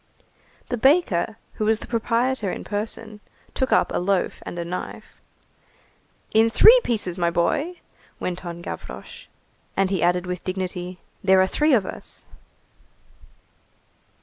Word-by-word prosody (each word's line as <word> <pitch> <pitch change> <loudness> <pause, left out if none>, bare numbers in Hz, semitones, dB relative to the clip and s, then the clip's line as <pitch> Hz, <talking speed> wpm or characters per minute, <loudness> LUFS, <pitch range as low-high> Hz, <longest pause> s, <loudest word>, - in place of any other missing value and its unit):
The 245 - -1
baker, 225 - +3 0.2
who 215 - -2
was 220 0 +3
the - - -9
proprietor 230 -2 0
in - - -6
person, 215 +1 -3 0.3
took 260 - -1
up - - +3
a - - +1
loaf 185 +1 0
and - - -6
a 170 - -3
knife. 180 +2 -7 1.1
"In 220 +1 +4
three 460 - +8
pieces, 195 -6 -1
my 170 -1 +2
boy!" 280 - 0 0.4
went 180 0 -4
on 170 -1 -7
Gavroche. 480 - -8 0.5
And 195 0 +2
he 190 -4 0
added 180 +1 +2
with 180 0 -4
dignity:— 185 -1 -4 0.3
"There 190 -1 +5
are 185 - +5
three 300 +8 +3
of 205 -5 +1
us." - - -9
200 Hz, 140 wpm, -23 LUFS, 180-235 Hz, 1.1 s, three